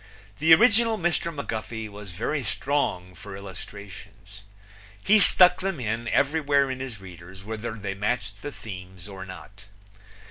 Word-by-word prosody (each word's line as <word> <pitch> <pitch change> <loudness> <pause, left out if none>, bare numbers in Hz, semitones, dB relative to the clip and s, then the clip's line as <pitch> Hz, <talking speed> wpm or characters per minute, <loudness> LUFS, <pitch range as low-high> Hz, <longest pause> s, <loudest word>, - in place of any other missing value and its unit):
The 160 +1 +3
original 225 +2 +4
Mr. 170 -2 0
McGuffey 110 -6 -4
was 105 -1 -10
very 115 - -2
strong 115 -10 -1
for 100 +3 -10
illustrations. 100 0 -10 0.6
He 215 +2 +6
stuck 180 -2 +6
them 190 -5 -2
in 115 0 -2
everywhere 140 0 +2
in 130 - -5
his 130 -5 -6
readers, 90 0 -12
whether 110 +2 -5
they 105 -3 -4
matched 100 0 -2
the 145 - -5
themes 95 -5 -9
or 95 -1 -8
not. 100 +2 -11
110 Hz, 140 wpm, -26 LUFS, 95-145 Hz, 0.6 s, He